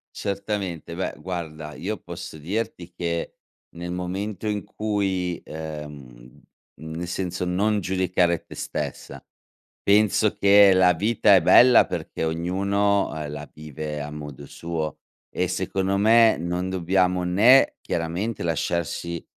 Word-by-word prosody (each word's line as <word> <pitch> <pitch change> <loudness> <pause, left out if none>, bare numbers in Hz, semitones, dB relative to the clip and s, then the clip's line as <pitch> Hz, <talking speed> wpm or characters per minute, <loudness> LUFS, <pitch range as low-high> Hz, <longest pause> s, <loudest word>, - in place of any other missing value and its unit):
Certamente. 100 -5 -4
Beh, 95 - -3
guarda, 80 -4 -6
io 105 +4 -4
posso 85 -2 -9
dirti 90 +1 -4
che, 85 -1 -3 0.4
nel 85 +1 -6
momento 95 +3 -4
in 105 -1 -2
cui, 95 -5 -2
ehm, 75 -6 -9 0.4
nel 80 +2 -6
senso, 90 0 -3
non 100 +4 +1
giudicare 90 -2 0
te - - -12
stessa. - - -5 0.6
Penso 105 +1 +3
che 100 0 +6
la 90 -1 +5
vita 105 +2 +3
è 95 - +5
bella 125 +7 +7
perché - - -5
ognuno, 100 +5 0
ehm, 75 -2 -5
la 75 0 -7
vive 75 0 -6
a 75 +1 -6
modo 75 -2 -8
suo. 80 -3 -4 0.3
E 90 - -1
secondo 95 +1 -1
me 110 +2 +5
non 90 +2 -2
dobbiamo 90 0 +1
né 105 +10 +5
chiaramente 85 +7 -3
lasciarci 85 0 -2
90 Hz, 125 wpm, -24 LUFS, 80-100 Hz, 0.6 s, bella